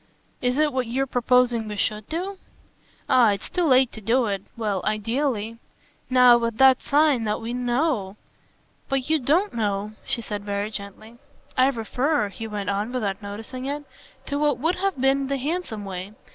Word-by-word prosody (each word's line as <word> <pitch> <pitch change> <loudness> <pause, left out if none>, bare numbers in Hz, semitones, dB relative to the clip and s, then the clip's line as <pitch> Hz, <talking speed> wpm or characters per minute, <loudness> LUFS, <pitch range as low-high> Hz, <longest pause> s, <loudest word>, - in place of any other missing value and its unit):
"Is 250 +1 +1
it 300 -2 +2
what 255 -2 -1
you're 260 +4 0
proposing 245 -2 +2
we 210 - -5
SHOULD 210 +1 -1
do?" 370 +5 -3 0.7
"Ah 235 -5 +5
it's 200 - -7
too 355 -1 +1
late 260 -3 +4
to 220 - -10
do 235 +4 +2
it 200 -3 -2 0.2
well, 210 -5 -1
ideally. 225 +1 -1 0.5
Now, 250 -2 +7
with 230 -1 -2
that 265 0 +6
sign 290 -4 +3
that 210 0 -1
we 230 +1 -5
KNOW 245 -5 -1 0.3
!" - - -39
"But 270 +2 -1
you 315 - +4
don't 325 +10 +1
know," 210 -2 -1
she 235 - -2
said 205 -2 -5
very 205 +1 -2
gently. 215 +3 -9 0.4
"I 260 +1 +5
refer," 250 0 0
he 225 +3 -7
went 205 -2 -3
on 205 +4 -2
without 210 -5 -2
noticing 220 +5 -7
it, 290 +2 -3 0.4
"to 285 0 -2
what 295 -1 +2
would 325 +8 0
have 385 -5 -1
been 270 +1 +2
the 275 0 -1
handsome 275 - -3
way. 190 +1 -6
240 Hz, 180 wpm, -24 LUFS, 210-270 Hz, 0.7 s, Now